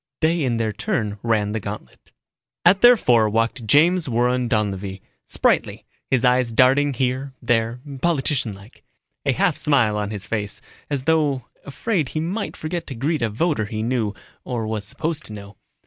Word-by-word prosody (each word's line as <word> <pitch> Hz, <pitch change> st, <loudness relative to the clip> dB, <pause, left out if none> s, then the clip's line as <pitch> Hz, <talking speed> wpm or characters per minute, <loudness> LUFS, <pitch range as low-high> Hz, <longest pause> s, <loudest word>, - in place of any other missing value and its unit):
They 165 Hz, +1 st, +2 dB
in 125 Hz, -4 st, 0 dB
their 110 Hz, -2 st, -1 dB
turn 105 Hz, 0 st, -2 dB
ran 110 Hz, -3 st, +1 dB
the 110 Hz, -, -2 dB
gantlet. 100 Hz, -, -9 dB, 0.5 s
At 190 Hz, +3 st, +6 dB
their 245 Hz, 0 st, +8 dB
fore 115 Hz, -, +3 dB
walked 115 Hz, +2 st, -1 dB
James 165 Hz, -, +4 dB
Warren 125 Hz, +1 st, +1 dB
Donlevy, 100 Hz, -4 st, -1 dB, 0.3 s
spritely, -, -, +1 dB, 0.3 s
his 130 Hz, -1 st, +2 dB
eyes 125 Hz, -1 st, +3 dB
darting 135 Hz, +4 st, +4 dB
here, 130 Hz, +2 st, -2 dB
there, 115 Hz, +1 st, 0 dB, 0.2 s
politician 145 Hz, -8 st, 0 dB
like. 100 Hz, +4 st, -16 dB, 0.4 s
A -, -, +5 dB
half -, -, +1 dB
smile 120 Hz, -8 st, +2 dB
on 105 Hz, -1 st, -2 dB
his 100 Hz, -3 st, -5 dB
face, 105 Hz, -1 st, -3 dB, 0.3 s
as 140 Hz, -3 st, -2 dB
though 145 Hz, -5 st, +1 dB, 0.2 s
afraid 160 Hz, -, -1 dB
he 155 Hz, -, -3 dB
might 185 Hz, +7 st, -3 dB
forget 170 Hz, +2 st, -4 dB
to 135 Hz, -, -6 dB
greet 145 Hz, +5 st, -1 dB
a 115 Hz, -, +1 dB
voter 130 Hz, +1 st, 0 dB
he 110 Hz, 0 st, -4 dB
knew, 115 Hz, -4 st, -1 dB, 0.3 s
or 120 Hz, -3 st, -3 dB
was 110 Hz, -1 st, -3 dB
supposed 160 Hz, +8 st, -3 dB
to 110 Hz, -, -7 dB
know. 100 Hz, -1 st, -10 dB
125 Hz, 170 wpm, -22 LUFS, 110-145 Hz, 0.5 s, their